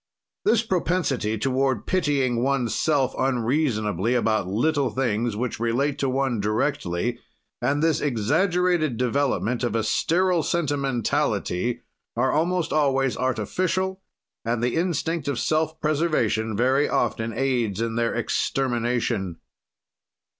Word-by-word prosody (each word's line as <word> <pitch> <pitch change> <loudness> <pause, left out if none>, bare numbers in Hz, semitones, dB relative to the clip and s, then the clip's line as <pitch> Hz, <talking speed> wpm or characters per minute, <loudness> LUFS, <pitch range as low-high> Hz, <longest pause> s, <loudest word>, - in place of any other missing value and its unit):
This 225 -1 +3
propensity 170 - 0
toward 130 0 0
pitying 140 -9 +1
oneself 135 +1 +1
unreasonably 120 - 0
about 110 -5 +1
little 135 +8 +1
things 120 -3 -1
which 120 -1 -3
relate 135 +5 0
to 135 - +1
one 130 -3 0
directly 110 -1 -1 0.4
and 140 +5 +1
this 165 -2 +2
exaggerated 155 - +1
development 125 -2 0
of 120 - -1
a 115 - +1
sterile 175 - +2
sentimentality 135 - -1 0.3
are 130 +2 +2
almost 170 +2 0
always 135 -3 +2
artificial, 185 - -1 0.4
and 115 0 -1
the 125 - 0
instinct 165 -2 -1
of 140 -4 -1
self 160 +2 0
preservation 125 -9 0
very 130 +5 +2
often 115 0 0
aids 120 -4 0
in 115 0 -1
their 115 0 0
extermination. 120 -6 -1
130 Hz, 110 wpm, -24 LUFS, 115-150 Hz, 0.4 s, This